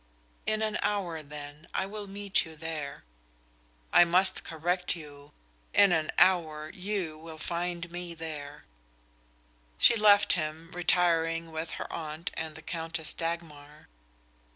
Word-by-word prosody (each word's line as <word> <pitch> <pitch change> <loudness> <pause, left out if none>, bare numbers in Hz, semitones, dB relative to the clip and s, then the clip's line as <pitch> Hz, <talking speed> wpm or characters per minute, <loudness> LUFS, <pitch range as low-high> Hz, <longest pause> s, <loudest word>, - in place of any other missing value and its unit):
"In 215 0 +1
an 215 -1 0
hour, 180 -6 -1
then, 145 +1 -9
I 190 - +1
will 205 +1 -6
meet 200 0 +1
you 160 -1 -10
there." 155 -3 -5 0.9
"I - - +9
must 180 +3 +2
correct 175 +3 0
you. 145 -3 -11 0.4
In 200 -2 +7
an 160 -2 +2
hour 155 -4 +3
you 185 -5 -3
will 160 0 -9
find 170 +1 -3
me 175 -1 -5
there." 150 -3 -7 1.1
She - - +7
left 210 -2 +6
him, 160 0 -3
retiring 165 -2 +2
with 160 +1 -4
her - - -4
aunt 155 0 -4
and 160 -1 -5
the 160 - -11
Countess 165 -1 -4
Dagmar. 155 -3 -5
165 Hz, 130 wpm, -30 LUFS, 155-180 Hz, 1.1 s, I